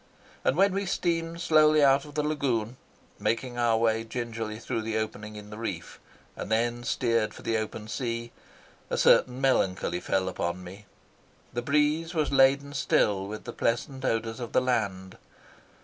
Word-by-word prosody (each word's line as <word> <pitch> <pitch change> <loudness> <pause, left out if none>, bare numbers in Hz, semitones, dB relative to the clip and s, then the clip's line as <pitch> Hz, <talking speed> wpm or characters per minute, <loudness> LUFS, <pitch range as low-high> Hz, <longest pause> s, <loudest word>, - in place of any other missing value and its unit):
And 135 - +2
when 195 +1 +4
we 195 0 -2
steamed 170 -1 -1
slowly 155 -2 +5
out 140 +1 +4
of 150 - -12
the 150 - +1
lagoon, 130 -6 -1 0.4
making 120 +1 -1
our 115 -2 +3
way 115 0 +1
gingerly 115 -2 -4
through 115 0 -3
the 110 0 -2
opening 110 -1 -4
in 105 0 -10
the 105 - -8
reef, 95 -7 -5 0.4
and - - -6
then 120 +2 +1
steered 115 -2 0
for - - -12
the 115 - 0
open 110 0 -5
sea, 115 0 -3 0.6
a - - -1
certain 125 0 +4
melancholy 95 -9 +1
fell 95 +1 0
upon 90 0 -3
me. 100 +3 -11 0.7
The 120 - -1
breeze 150 +5 +1
was 155 -3 +1
laden 140 +1 +4
still 100 -7 +1
with 105 +1 -7
the - - -7
pleasant 130 +3 -1
odours 115 -1 -1
of 120 -2 -6
the - - +4
land. 100 -7 -2
115 Hz, 165 wpm, -28 LUFS, 110-140 Hz, 0.7 s, slowly